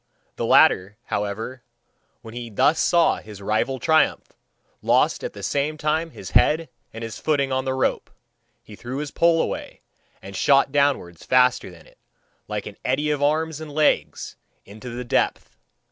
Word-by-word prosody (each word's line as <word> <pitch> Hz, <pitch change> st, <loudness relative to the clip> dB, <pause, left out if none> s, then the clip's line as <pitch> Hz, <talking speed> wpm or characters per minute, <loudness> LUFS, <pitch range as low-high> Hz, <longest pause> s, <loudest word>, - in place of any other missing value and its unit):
The -, -, -3 dB
latter, 100 Hz, +3 st, +4 dB
however, 110 Hz, +5 st, -4 dB, 0.6 s
when 110 Hz, -, -10 dB
he 120 Hz, -1 st, -6 dB
thus 140 Hz, +9 st, +2 dB
saw 170 Hz, -1 st, +3 dB
his 105 Hz, -2 st, -11 dB
rival 110 Hz, +6 st, -1 dB
triumph, 160 Hz, +3 st, +1 dB, 0.5 s
lost -, -, +2 dB
at -, -, -5 dB
the -, -, -10 dB
same 145 Hz, +2 st, -1 dB
time 155 Hz, +2 st, -1 dB
his -, -, -10 dB
head 160 Hz, +2 st, +3 dB, 0.2 s
and 115 Hz, +1 st, -8 dB
his 115 Hz, -1 st, -6 dB
footing 140 Hz, -3 st, 0 dB
on 130 Hz, 0 st, -1 dB
the 130 Hz, 0 st, -1 dB
rope; 130 Hz, -, -1 dB, 0.5 s
he 105 Hz, -, -12 dB
threw 125 Hz, +5 st, -6 dB
his 145 Hz, -1 st, -4 dB
pole 170 Hz, -1 st, +3 dB
away, -, -, -4 dB, 0.4 s
and 95 Hz, 0 st, -10 dB
shot 135 Hz, +7 st, +3 dB
downwards 140 Hz, -, 0 dB
faster 125 Hz, -4 st, +3 dB
than 85 Hz, -3 st, -15 dB
it, -, -, -23 dB, 0.5 s
like -, -, -4 dB
an -, -, -9 dB
eddy 145 Hz, +4 st, 0 dB
of 145 Hz, -1 st, -2 dB
arms 155 Hz, +1 st, 0 dB
and 155 Hz, -1 st, -8 dB
legs, 150 Hz, +1 st, 0 dB, 0.3 s
into 110 Hz, +5 st, -10 dB
the 120 Hz, +1 st, -6 dB
depth. -, -, -1 dB
130 Hz, 165 wpm, -23 LUFS, 115-150 Hz, 0.6 s, latter